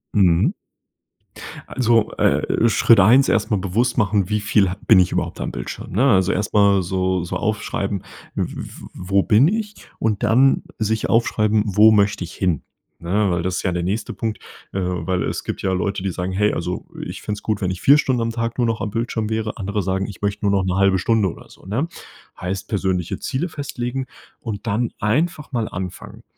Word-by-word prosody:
Mhm. 90 -5 +4 1.1
Also, 115 -3 +2
äh, 115 - +2
Schritt 115 0 +5
1 120 +8 +6
erst 110 -1 +1
mal 105 - +3
bewusst 105 +7 0
machen, 105 -4 +1
wie 105 0 +1
viel 105 -2 +2
ha 90 - -4
bin 110 -5 +7
ich 90 - +3
überhaupt - - -2
am - - -3
Bildschirm, - - -7
ne? 105 +8 +1
Also 95 -1 +3
erst 105 - -2
mal 100 -2 +4
so 95 0 -1
so 90 +2 -4
aufschreiben: 100 -1 -2 0.3
„W - - -2
w - - -9 0.2
wo 95 +2 0
bin 115 +5 +5
ich“ 210 +2 -2 0.2
und 110 -3 -1
dann 130 +4 +4 0.2
sich 110 0 -1
aufschreiben, 110 -2 +2
„wo 105 +2 +6
möchte 105 -2 +2
ich 85 - -8
hin?“ 90 -6 -1 0.4
Ne, 100 +4 0
weil 85 -1 -1
das 95 0 -1
ist - - -3
ja 90 - +1
der 85 0 -2
nächste 105 +5 -2
Punkt, 110 -1 -3 0.3
äh, 95 - -3
weil 90 0 -1
es - - -3
gibt - - -5
ja 95 - 0
Leute, 95 +1 -2
die 95 - -1
sagen: 90 +1 -3
„Hey 105 +3 +1
also 90 +2 -3 0.2
ich - - -7
fände 105 - -4
es 105 - -12
gut, 105 -2 -1
wenn 95 -1 0
ich 90 - -6
4 140 +2 +7
Stunden 130 -5 +1
am 115 0 -1
Tag 115 0 -3
nur 120 -2 +2
noch 115 -1 -1
am 105 - -3
Bildschirm 115 -1 -2
wäre“, 110 -1 -2
andere 100 0 -2
sagen: 95 +1 -1
„Ich 100 - -10
möchte 100 0 -2
nur 100 - +3
noch 100 -1 +2
1/2 95 +1 +2
Stunde 105 +1 +2
oder - - -14
so“, - - -18
ne? 115 - -1 0.5
Heißt 90 +1 -4
persönliche 95 -4 -1
Ziele 150 +7 -2
festlegen 130 -3 -4 0.3
und 110 -1 -6
dann 110 +2 0
einfach 150 +9 0
mal 115 -4 -1
anfangen, 90 -1 -7
105 Hz, 205 wpm, -21 LUFS, 95-115 Hz, 1.1 s, bin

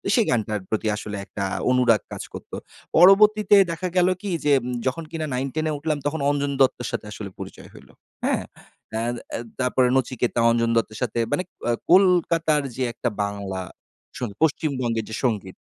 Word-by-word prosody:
সেই 230 - +3
গানটার 110 -3 0
প্রতি 110 0 -1
আসলে 105 -1 -6
একটা 100 0 -5 0.3
অনুরাগ 125 -4 +4
কাজ - - -5
করত। - - -10 0.5
পরবর্তীতে 210 +4 +6 0.2
দেখা 175 +2 -3
গেল 180 0 +5
কি? 205 - -4 0.2
যে 145 - +4 0.4
যখন 130 +6 -2
কিনা 160 -1 -3
9-10 135 +5 -2
এ - - 0
উঠলাম 155 +1 -1
তখন 150 +2 -1
অঞ্জন 145 0 0
দত্তের 125 -3 +2
সাথে - - -4
আসলে 105 -1 -7
পরিচয় - - -9
হইল - - -15 0.4
হ্যাঁ, - - +1 0.5
আ - - 0 0.4
আ - - -1 0.2
তারপরে 125 0 +2
নচিকেতা, 125 -2 0
অঞ্জন 115 0 +1
দত্তের 110 -1 -1
সাথে 120 - -2
মানে 145 +5 +1 0.3
আ - - +4 0.2
কলকাতার 170 -5 +4
যে 130 - -1
একটা 120 - -2
বাংলা 100 -2 -4 0.8
পশ্চিমবঙ্গের 130 -7 0
যে 110 - -4
সঙ্গীত। 105 -7 -1
130 Hz, 160 wpm, -23 LUFS, 110-160 Hz, 0.8 s, পরবর্তীতে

